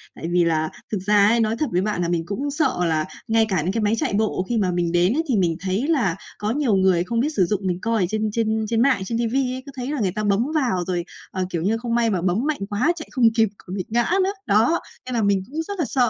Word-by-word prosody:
Tại - - -6
vì 175 0 +3
là 160 -2 +1 0.2
thực 210 - 0
ra 205 -1 +5
ấy, 230 +2 +3
nói 220 0 +1
thật 305 - 0
với 180 +1 +1
bạn 205 -2 -1
là 170 - 0
mình 170 -2 -1
cũng 270 +10 -3
sợ 305 +2 0
là 155 -2 +1 0.2
ngay 225 -1 +3
cả 185 -5 +1
những 175 - -1
cái 225 +3 -1
máy 210 +1 +2
chạy - - -1
bộ 205 -3 0
khi 240 - +1
mà 190 -4 +1
mình 175 -1 0
đến 175 +4 +3
ấy, 320 +4 0
thì 245 - +3
mình 170 -3 +2
thấy 195 - -1
là 235 - +1 0.2
có 210 +1 -2
nhiều 255 -5 +1
người 190 -2 +3
không 230 +6 -2
biết 275 +6 +1
sử 200 - +2
dụng, 200 +2 -1
mình 180 -1 -1
coi 225 -3 +1
ở - - +3
trên 215 +1 -1
trên 220 0 0
trên 230 -1 +2
mạng, 255 -5 +3
trên 230 +4 -2
ti 235 0 0
vi 255 +2 0
ấy, 260 0 -6
cứ 280 - -9
thấy 255 +1 -4
là 295 - -2
người 190 -4 +1
ta 215 - -2
bấm 205 +3 +2
vào 240 - +1
rồi, 175 -2 -1 0.3
ờ, 185 -1 -2
kiểu 170 -3 -2
như, 210 +6 +1
không 235 0 -2
may 235 -1 +2
mà 190 -5 0
bấm 190 +8 0
mạnh 310 - -1
quá 235 +11 +2
chạy 315 - -8
không 255 -4 +2
kịp 225 -3 +3
còn 185 - -8
bị 185 - -3
ngã 235 +2 +2 0.2
nữa. 385 - +1
Đó, 225 +11 +3 0.3
nên 255 - -5
là 230 - +1
mình 200 -2 +2
cũng 310 +5 -3
rất 400 +3 -6
là 320 - +1
sợ. 250 -3 +2
215 Hz, 300 wpm, -22 LUFS, 185-245 Hz, 0.3 s, ra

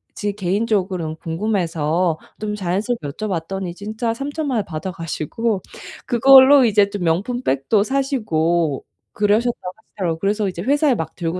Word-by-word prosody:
제 205 -1 -2
개인적으로는 190 -4 -1
궁금해서 165 -2 -1 0.2
좀 210 -1 -2
자연스럽게 200 0 -2
여쭤봤더니 185 +1 -4
진짜 220 +4 -3
30,000,000 280 +1 -3
원 210 - -1
받아가시고 175 +5 -3 0.4
그걸로 265 +2 +7
이제 205 -2 +3
좀 200 -2 -5
명품 205 +10 0
백도 140 - +1
사시고 175 - 0 0.3
그러셨다고 210 -2 0
하시더라고요. 180 -6 -4
그래서 205 +2 0
이제 175 -2 -6
회사에 285 - +2
막 160 -5 -5
들고 170 +1 -3
200 Hz, 340 characters per minute, -20 LUFS, 170-230 Hz, 0.4 s, 그걸로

